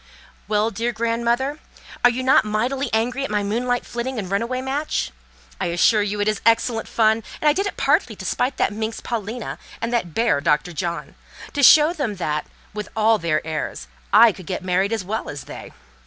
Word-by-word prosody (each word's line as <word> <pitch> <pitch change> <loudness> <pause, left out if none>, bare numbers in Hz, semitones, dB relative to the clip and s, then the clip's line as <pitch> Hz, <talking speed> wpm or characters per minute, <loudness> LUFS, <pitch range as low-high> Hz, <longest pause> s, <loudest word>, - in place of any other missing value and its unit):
"Well, 215 +1 +1
dear 230 +2 -1
grandmother! 235 +3 0
and 300 - -14 0.4
are 245 - +8
you 250 +2 -2
not 260 - +5
mightily 240 +6 -1
angry 245 +5 0
at - - -3
my 210 -1 0
moonlight 245 +4 -1
flitting 240 +2 -4
and 195 -4 -4
run 200 - +1
away 255 +2 -2
match? 270 - -2 0.5
I - - -1
assure 175 +6 +3
you 205 0 -2
it 205 - +1
is 215 -1 0
excellent 230 0 +2
fun, 220 0 +2 0.2
and 305 - +1
I 295 - +6
did 395 +5 0
it - - -6
partly 275 - +2
to 190 - -9
spite 250 +8 -1
that - - +1
minx, 220 +1 -3
Paulina, 230 +1 -5 0.2
and 235 +1 -3
that 180 -9 -1
bear, 225 -11 +2
Dr. 150 +2 +1
John: 170 +1 -4 0.4
to 290 - -1
show 300 +5 +7
them 275 - -2
that, 150 -5 -2 0.3
with 210 0 -5
all 220 0 +3
their 160 -2 0
airs, 155 - -4 0.2
I 235 - +8
could 185 -3 -12
get 185 - -3
married 190 +3 +1
as 220 -5 -2
well 220 +4 -3
as 145 - -6
they. - - -10
225 Hz, 205 wpm, -22 LUFS, 200-245 Hz, 0.5 s, are